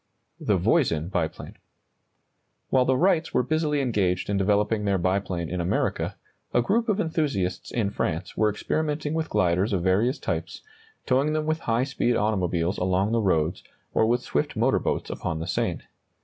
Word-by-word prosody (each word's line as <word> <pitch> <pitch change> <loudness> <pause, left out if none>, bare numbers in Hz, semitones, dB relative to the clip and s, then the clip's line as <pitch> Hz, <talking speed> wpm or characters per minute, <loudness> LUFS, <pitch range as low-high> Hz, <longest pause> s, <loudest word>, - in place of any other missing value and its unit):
THE - - +1
VOISIN 80 +1 +1
BIPLANE. 85 -5 -3 1.1
While 130 -1 +4
the 130 0 +2
Wrights 170 -1 +2
were - - +4
busily 150 +1 0
engaged 100 -7 0
in 100 - +1
developing 105 +2 +1
their 100 -1 +2
biplane 95 -1 -1
in 90 +2 -3
America, 85 - -1 0.4
a 120 - +5
group 225 - +1
of 210 -1 +1
enthusiasts 140 - -1
in 105 -4 -1
France 85 -1 -3
were 110 -1 +3
experimenting 150 +7 -2
with 160 0 -2
gliders 95 +1 +1
of 90 -3 0
various 105 - +2
types, - - -4 0.4
towing 135 +4 +2
them 155 0 0
with 155 +1 0
high 115 +2 +2
speed 130 -3 0
automobiles 90 -5 0
along 95 +3 +1
the 115 0 +2
roads, 85 -4 +1 0.3
or 110 - +3
with 120 +2 +1
swift - - -1
motor - - +2
boats - - -2
upon 80 - -3
the 80 - -4
Seine. 85 - -1
105 Hz, 165 wpm, -25 LUFS, 90-140 Hz, 1.1 s, a